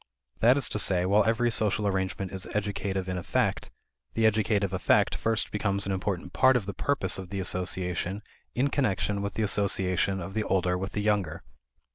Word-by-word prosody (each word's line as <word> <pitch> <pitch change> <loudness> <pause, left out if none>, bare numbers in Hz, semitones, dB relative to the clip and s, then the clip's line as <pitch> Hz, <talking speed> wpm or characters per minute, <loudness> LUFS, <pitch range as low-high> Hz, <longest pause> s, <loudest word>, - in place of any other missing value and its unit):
That 125 +4 +5
is 140 - 0
to 105 - -2
say, 90 -3 +3
while 100 +3 +4
every 115 +1 +1
social 105 -2 +3
arrangement 95 -1 -2
is 95 +1 -5
educative 100 -2 -2
in 90 -1 -3
effect, 85 - -1 0.5
the 115 - +2
educative 105 -3 +1
effect 95 - +2
first 110 -1 -1
becomes 100 -1 -1
an 100 - -2
important 95 -2 -3
part 130 0 +4
of 110 - -4
the 100 - -5
purpose 95 -11 +2
of 95 -1 -8
the 100 - -4
association 90 +1 -2 0.3
in 135 +3 +1
connection 105 -7 -1
with 100 0 -4
the 110 - -1
association 95 -1 +1
of 95 +2 -7
the 110 - -1
older 90 -2 0
with 95 +2 -5
the 105 - -2
younger. 100 -6 -1
100 Hz, 185 wpm, -27 LUFS, 95-105 Hz, 0.5 s, That